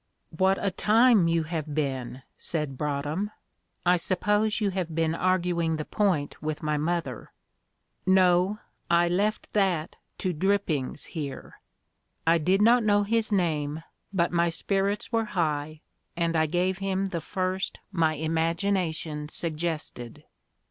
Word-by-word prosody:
"What 190 +3 +3
a 200 - +2
time 215 0 +4
you 165 -1 +2
have 155 -2 -4
been!" 135 -3 -2
said 150 -5 -3
Broadhem. 150 +7 -2 0.6
"I 180 +1 +5
suppose 210 +5 +1
you 205 -3 +1
have 180 -4 -3
been 165 -1 +1
arguing 175 -2 +1
the 155 -1 -4
point 180 -9 0
with 155 0 -3
my 150 0 0
mother?" 150 -5 -2 0.8
"No, 185 +1 +4 0.3
I 170 0 +4
left 205 +5 -1
that 185 -6 +1 0.2
to 185 -2 -1
Drippings 165 -6 0
here." 145 -5 -7 0.7
I 165 +1 +4
did 190 +6 +3
not 235 +2 +5
know 205 -1 +3
his 225 +1 0
name, 160 -5 0 0.3
but 175 -3 +1
my 170 0 +2
spirits 195 +5 -1
were 225 -1 +1
high, 155 -1 -1 0.4
and 170 -1 0
I 160 0 +3
gave 180 +3 0
him 195 0 -1
the 175 -4 -3
first 185 +3 -2
my 160 -4 +2
imagination 160 -1 -1
suggested. 155 -8 -4
170 Hz, 135 wpm, -27 LUFS, 155-195 Hz, 0.8 s, I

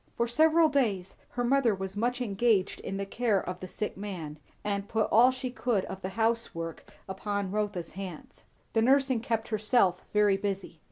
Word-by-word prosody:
For 235 - +1
several 315 +6 +5
days 215 -11 0
her 245 - -2
mother 245 -3 +3
was 190 0 -5
much 245 +4 0
engaged 205 -3 +1
in 195 - -4
the 200 - -2
care 215 0 +1
of 180 0 -5
the 185 - -7
sick 210 +3 -4
man, 175 -7 -6 0.2
and 200 0 -2
put 220 -1 +1
all 240 +3 +7
she 255 -1 -3
could 240 -6 0
of 190 - -7
the 190 - -3
housework 225 -8 -1 0.2
upon 200 0 -3
Rotha's 205 -5 -2
hands; 185 -4 -8 0.3
the 225 - +3
nursing 265 0 +3
kept 225 -2 -2
herself 210 -4 +2
very 210 -2 +4
busy. 195 -4 -4
210 Hz, 175 wpm, -29 LUFS, 190-240 Hz, 0.3 s, all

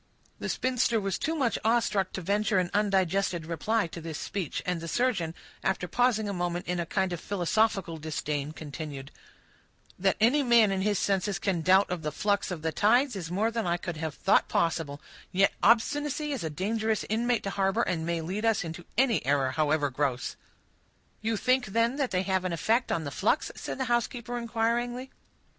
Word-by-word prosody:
The - - -4
spinster 250 -3 +1
was 195 -2 -2
too 320 +1 -1
much 255 -8 0
awe 230 +2 +4
struck 195 -5 -1
to 190 - -4
venture 205 +3 +1
an 180 -1 +1
undigested 195 -4 +1
reply 205 +7 0
to 170 0 -8
this 160 -2 -5
speech; 185 -7 -4
and 180 -2 -1
the 165 - -6
surgeon, 190 -7 0 0.3
after 190 -2 -1
pausing 230 +1 +2
a 200 - -2
moment 175 -1 -2
in 180 0 -2
a 170 - -2
kind 190 -1 0
of 175 - -4
philosophical 195 -2 0
disdain, 150 -1 -3
continued,— 145 -3 -7 0.9
"That 190 +1 +2
any 245 +7 +4
man 235 -5 +5
in 190 -1 0
his 205 0 +1
senses 195 0 0
can 175 -2 -1
doubt 190 +4 +5
of 180 -2 -2
the 150 -1 -2
flux 200 +6 0
of 175 -4 -5
the 160 - 0
tides 245 - +3
is 175 -4 -5
more 210 +6 +1
than 230 -4 -2
I 170 0 +1
could 170 -2 -5
have 155 -2 -4
thought - - +3
possible; 160 -4 -1 0.3
yet 195 +2 +3
obstinacy 290 +6 +2
is 270 -9 -3
a 160 - -2
dangerous 215 +7 -1
inmate 235 +2 +1
to 195 - -2
harbor, 195 +3 +1
and 165 -3 -1
may 170 0 -1
lead 190 +7 -3
us 225 -4 +2
into 165 +1 -7
any 250 -3 +3
error, 135 0 +2
however 150 -1 +1
gross." 130 -2 -1 0.9
"You 220 0 0
think, 255 +2 +2
then, 230 +6 +1
they 240 -10 0
have 190 -1 0
an 185 -2 -2
effect 225 +10 +1
on 165 - 0
the 140 - -5
flux?" 225 - +1
said - - -5
the 265 - -1
housekeeper, 240 0 -1
inquiringly. 240 +2 -1
195 Hz, 190 wpm, -28 LUFS, 165-230 Hz, 0.9 s, man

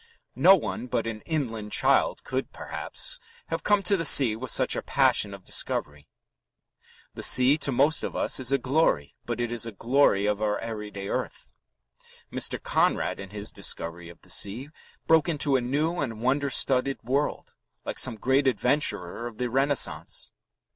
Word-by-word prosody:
No 195 - +8
one 110 - -5
but 115 -1 -2
an 110 -2 -5
inland 115 -10 -3
child - - +1
could, - - -4
perhaps, - - -3 0.3
have 165 0 -4
come 205 -1 +2
to 200 +2 +3
the 165 - -2
sea 135 -7 +7
with 125 +3 -7
such - - +2
a - - -3
passion 100 - +2
of 100 -1 -11
discovery. 75 -3 -2 1.1
The - - -8
sea 130 +3 +6
to 140 - -2
most 140 +5 +2
of - - -5
us - - +1
is 130 0 -1
a 140 - +3
glory, 130 - 0
but 120 -1 -4
it 120 -1 -2
is 115 -1 -1
a - - -6
glory 115 -2 +2
of 105 0 -1
our 105 -1 0
everyday 105 -3 -7
earth. - - -5 0.8
Mr. - - 0
Conrad, - - 0
in 100 - -8
his 105 +1 -6
discovery 85 +1 -3
of 85 - -15
the - - -11
sea, 115 +8 0 0.4
broke 160 0 +3
into 145 -3 0
a 130 - +2
new 150 +8 -1
and 115 -6 -4
wonder 140 +4 0
studded 130 0 +2
world, 135 +5 -2 0.3
like - - -4
some 125 -3 +2
great 135 +5 +1
adventurer 120 - 0
of 115 -2 -11
the 125 -1 -3
Renaissance. 135 +1 0
125 Hz, 175 wpm, -26 LUFS, 105-140 Hz, 1.1 s, No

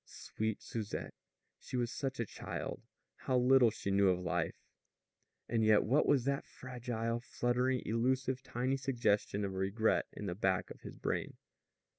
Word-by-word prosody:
Sweet 110 -1 -4
Susette! 110 -3 -4 0.5
She 125 - -5
was 120 -1 0
such 135 -3 -3
a 115 - +1
child! - - -5 0.4
How 130 - 0
little 125 -1 +6
she 100 -2 -4
knew 100 0 +5
of 90 -1 +2
life! 85 -2 -1 0.9
And 115 -1 +1
yet 110 -1 +5
what 135 +7 +3
was 140 -4 +4
that 140 0 -1
fragile, 120 -2 -3
fluttering, 125 +1 0
elusive, 130 +3 +1
tiny 130 +2 -1
suggestion 110 -6 +1
of 95 - -3
a - - -7
regret 100 +4 +1
in 105 - -7
the 90 - -2
back 95 -1 0
of - - -11
his - - -9
brain? - - -2
115 Hz, 160 wpm, -34 LUFS, 105-130 Hz, 0.9 s, little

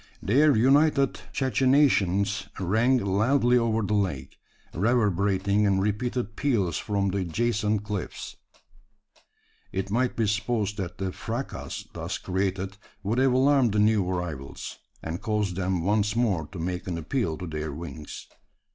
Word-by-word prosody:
Their 140 +7 +4
united 140 +3 +3
cachinnations 105 -7 +2
rang 110 +8 +3
loudly 120 +5 +2
over 115 -2 +2
the 105 - -1
lake 80 -11 -2 0.3
reverberating 100 -1 +2
in 100 -1 +2
repeated 105 +2 -1
peals 105 - 0
from 100 -2 0
the 100 +1 -1
adjacent 105 +3 0
cliffs. 105 -3 -5 1.4
It 95 +1 -3
might 125 +3 +1
be 115 - +1
supposed 105 0 -1
that 90 -4 -5
the 95 -1 -2
fracas 115 +8 -5
thus - - -4
created 95 +1 -2 0.3
would 110 +5 0
have 130 -1 +4
alarmed 130 -3 +4
the 105 - +2
new 105 -1 +4
arrivals: 85 -7 -5 0.2
and 80 +2 -4
caused 105 -4 -1
them 95 -2 -1
once 105 +2 +1
more 100 -11 +1
to 95 - -10
make 90 +2 -3
an 85 -2 -2
appeal 85 - -2
to 90 - -6
their 75 -2 -4
wings. 80 0 -8
105 Hz, 140 wpm, -26 LUFS, 95-120 Hz, 1.4 s, Their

